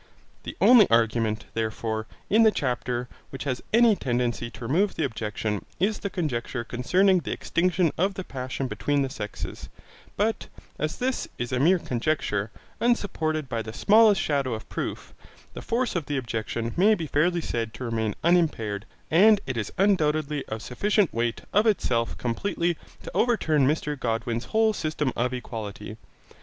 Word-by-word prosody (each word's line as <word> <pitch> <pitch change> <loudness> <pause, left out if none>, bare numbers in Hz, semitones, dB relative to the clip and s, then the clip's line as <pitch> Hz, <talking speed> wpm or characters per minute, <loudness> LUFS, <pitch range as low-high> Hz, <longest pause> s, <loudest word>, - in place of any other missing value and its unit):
The - - -8
only 240 -5 +7
argument, 115 -1 +2
therefore, 110 0 -2 0.2
in 220 +3 +4
the 220 - +7
chapter 125 - -2 0.2
which 135 - -6
has 130 -3 -2
any 230 -1 +5
tendency 120 -5 -1
to 120 - -9
remove 180 - +1
the 160 - -1
objection 105 -4 -3 0.2
is 205 +4 +1
the 200 - -3
conjecture 130 -8 -3
concerning 185 +12 +2
the - - -5
extinction 175 -1 +1
of 195 +2 +1
the 190 - -4
passion 130 -2 -4
between 145 +2 0
the 135 - -3
sexes, 105 -7 -6 0.5
but 220 +2 0 0.3
as 155 +2 -2
this 255 +1 -1
is 120 +1 -4
a 130 - 0
mere 175 +7 +5
conjecture, 120 - -1 0.3
unsupported 160 - 0
by 115 -2 -2
the 110 0 -7
smallest 210 - +5
shadow 140 -5 0
of 110 - -9
proof, - - -5 0.4
the - - -7
force 235 -1 -1
of 165 -5 -2
the 145 - -1
objection 115 -1 -3
may 210 +4 +5
be 165 - -4
fairly 170 +4 +1
said 115 -8 -3
to 130 - -7
remain 110 -3 -1
unimpaired, 150 - +1 0.3
and 205 +6 +6
it 130 - -3
is 110 -3 -3
undoubtedly 155 -6 +2
of 110 0 -5
sufficient 200 - +1
weight 115 0 -1
of 210 +3 +4
itself 120 - +1
completely 170 +7 -1 0.3
to - - -7
overturn 160 - +2
Mr 150 -1 -1
Godwin's 115 0 -2
whole 220 0 +2
system 155 - -2
of 125 +1 0
equality. 110 -4 -6
140 Hz, 160 wpm, -26 LUFS, 115-185 Hz, 0.5 s, only